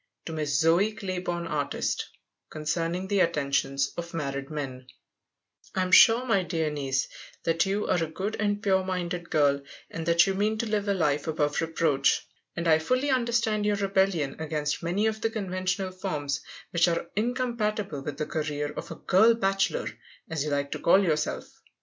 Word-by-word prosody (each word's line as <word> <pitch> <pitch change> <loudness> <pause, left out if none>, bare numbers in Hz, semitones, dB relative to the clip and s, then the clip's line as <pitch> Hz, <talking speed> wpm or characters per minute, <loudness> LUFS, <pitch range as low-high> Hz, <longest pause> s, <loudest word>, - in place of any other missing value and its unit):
To 165 - -5
Miss 150 -2 0
Zoe 175 +7 +3
Clayborn 180 -5 -3
Artist 145 -3 -2 0.4
Concerning 165 +4 -2
the 200 0 +1
Attentions 140 -4 +1
of 170 0 -6
Married 140 -3 -3
Men 130 -4 -5 0.9
I 185 - +2
am 185 - -3
sure, 230 +6 +7
my 225 -6 +3
dear 165 -4 -1
niece, 135 -2 -1 0.4
that 165 +3 +2
you 200 +2 0
are 175 - +1
a - - -2
good 190 +7 -4
and 205 -1 0
pure 190 -2 +3
minded 180 -2 -3
girl, 140 -2 +3 0.3
and 165 0 -5
that 170 0 +5
you 195 - 0
mean 210 +3 0
to 230 - -1
live 210 -2 -1
a 200 - +2
life 150 -4 0
above 150 -2 0
reproach, 160 -4 +1 0.3
and 170 0 -2
I 160 -1 +5
fully 255 - +1
understand 235 -4 +1
your 210 - +2
rebellion 190 -7 +1
against 150 -1 -2
many 180 +6 0
of 220 -1 -1
the 225 - +1
conventional 185 -3 -2
forms 150 -8 -3 0.3
which 170 0 +3
are 170 0 0
incompatible 215 - -1
with 140 +1 -5
the 150 - -1
career 150 -2 -2
of - - -6
a - - -6
"girl 220 +5 +4
bachelor," 195 - 0 0.5
as 155 -3 -1
you 150 - -2
like 140 -1 -1
to - - -3
call 190 +4 +5
yourself. 155 -4 -1
175 Hz, 175 wpm, -27 LUFS, 150-200 Hz, 0.9 s, sure